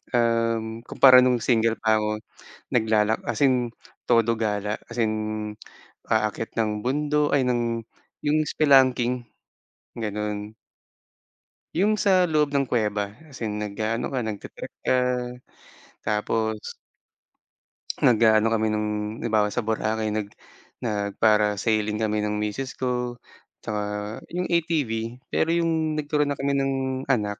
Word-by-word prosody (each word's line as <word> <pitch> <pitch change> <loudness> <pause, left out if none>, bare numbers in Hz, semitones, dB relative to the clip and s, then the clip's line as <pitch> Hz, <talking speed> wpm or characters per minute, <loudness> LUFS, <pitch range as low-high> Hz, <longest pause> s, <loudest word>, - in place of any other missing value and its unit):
Um, 115 -1 +1
kumpara 130 -2 +7
nung 125 -1 +3
single 115 -2 +2
pa 110 -1 +3
ako. 105 0 -2 0.5
Naglalak 110 -2 +2
as 120 - -2
in, 125 -3 +2 0.4
todo 115 -1 +4
gala 105 -1 -1 0.2
as 120 - -5
in 110 -2 +2 1.0
aakyat 110 0 0
ng 105 -1 0
bundo 150 +2 +1
ay 135 - +3
ng 120 -2 0 0.4
yung 150 +1 +2
spelunking, 125 -4 +3 0.7
ganon. 105 -1 -4 1.2
Yung 210 +5 +2
sa 185 -4 +3
loob 150 -2 +2
ng 140 -1 +1
kuweba 105 -3 -1
as 140 -5 -13
in 105 -2 -2
nag-aano 110 +2 -2
ka 130 - 0
nagta-trekk 110 -3 -6
ka. 130 - +3 1.1
Tapos 110 +1 -1 1.2
Nag-aano 110 -2 +4
kami 110 -1 +1
nung 105 0 -1 0.4
halimbawa, 110 -3 +2
sa 125 - 0
boracay 110 0 -1
nag 105 -1 -2 0.6
nag-parasailing 105 0 +1
kami 105 -1 0
ng 105 0 -1
misis 105 +6 -3
ko. 125 -1 -2 0.5
Tsaka 105 -1 -2 0.5
yung 180 +1 -2
ATV, 130 -9 -1
pero - - +1
yung 160 -2 +1
nagturo 150 -1 0
na 145 - -1
kami 140 +1 -1
ng 135 0 0 0.3
anak. 105 -6 0
115 Hz, 120 wpm, -25 LUFS, 105-130 Hz, 1.2 s, kumpara